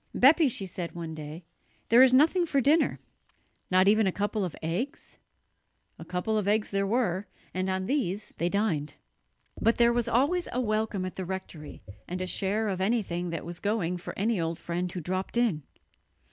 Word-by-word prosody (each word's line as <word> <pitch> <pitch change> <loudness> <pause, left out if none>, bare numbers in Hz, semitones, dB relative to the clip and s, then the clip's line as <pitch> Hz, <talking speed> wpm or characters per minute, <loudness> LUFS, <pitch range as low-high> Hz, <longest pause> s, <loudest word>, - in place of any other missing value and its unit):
"Bepi," 290 +3 +6
she 205 -4 -3
said 180 -2 -6
one 165 -2 -5
day, 155 +2 -8 0.4
"there 235 +2 +7
is 260 -1 +7
nothing 325 +7 +4
for 280 - +2
dinner." 295 +5 +3 0.7
"Not 185 +1 +4
even 215 0 +4
a - - +2
couple 205 +2 -1
of 180 -4 -4
eggs?" 180 - -4 0.8
A - - -7
couple 215 +5 -1
of 200 - -3
eggs 210 +1 +1
there 195 0 0
were, 205 -4 0 0.3
and 185 +1 -1
on 190 0 -1
these 210 -6 -2
they 170 - +1
dined. 175 -7 -1 0.7
But 230 - +3
there 235 0 +5
was 240 -1 0
always 285 +10 +2
a 250 - -1
welcome 215 -4 -1
at 185 - -6
the 190 - -3
rectory 175 - -7 0.2
and 180 +1 -4
a 185 - -2
share 200 +4 -1
of 190 -2 -2
anything 190 -5 0
that 165 -2 -4
was 175 +1 -7
going 200 -4 -1
for 175 - -8
any 210 -1 +1
old 165 0 -2
friend 175 +1 -3
who 180 - -5
dropped 185 +7 -3
in. 225 -11 +2
195 Hz, 190 wpm, -28 LUFS, 180-230 Hz, 0.8 s, there